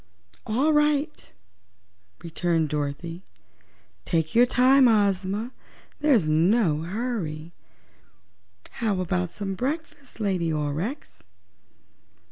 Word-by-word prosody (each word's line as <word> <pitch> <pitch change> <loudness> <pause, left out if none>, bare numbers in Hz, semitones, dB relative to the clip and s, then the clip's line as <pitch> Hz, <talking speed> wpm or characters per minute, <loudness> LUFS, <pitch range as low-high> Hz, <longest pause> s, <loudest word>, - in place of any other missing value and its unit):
"All 270 +8 +2
right," 295 - 0 0.9
returned 165 -1 0
Dorothy; 150 +4 -4 0.8
"take 160 -2 -1
your 245 +2 +5
time, 255 +2 +5
Ozma; 205 +1 +1 0.5
there's 270 - +3
no 160 +1 +2
hurry. 175 -5 -4 1.3
How 210 -5 0
about 180 -1 -1
some 195 +1 -5
breakfast, 290 - -5
Lady 185 -6 0
Aurex?" 150 - -4
195 Hz, 85 wpm, -25 LUFS, 165-250 Hz, 1.3 s, your